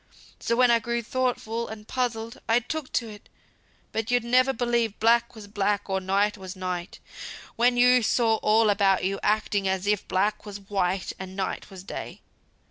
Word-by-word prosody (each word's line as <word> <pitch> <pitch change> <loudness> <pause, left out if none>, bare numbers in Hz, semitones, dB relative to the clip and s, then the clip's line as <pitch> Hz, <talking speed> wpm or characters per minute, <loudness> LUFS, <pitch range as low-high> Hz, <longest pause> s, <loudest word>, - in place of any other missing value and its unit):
So 235 - 0
when 250 0 +5
I 235 - +4
grew 235 +1 -2
thoughtful, 235 -2 -2
and 215 -1 -9
puzzled, 235 -2 -3
I 225 - +5
took 300 +3 -5
to 235 - 0
it. 210 -1 -12 0.6
But 225 0 -3
you'd 245 -1 +2
never 255 +2 +3
believe 235 -3 -1
black 235 +2 +3
was 215 -2 -10
black, 205 0 -1
or 190 - +1
night 200 +2 +1
was 190 +1 -8
night, 180 -1 -4 0.6
when 245 +1 +3
you 250 +1 +6
saw 225 0 +2
all 215 0 +3
about 195 -2 +2
you 195 +1 -1
acting 210 -2 +1
as 190 0 -1
if 205 -1 0
black 210 +3 0
was 205 -1 -8
white, 195 -2 -2
and 190 0 -7
night 190 -1 -3
was 190 -2 -10
day. - - -7
215 Hz, 180 wpm, -26 LUFS, 195-235 Hz, 0.6 s, you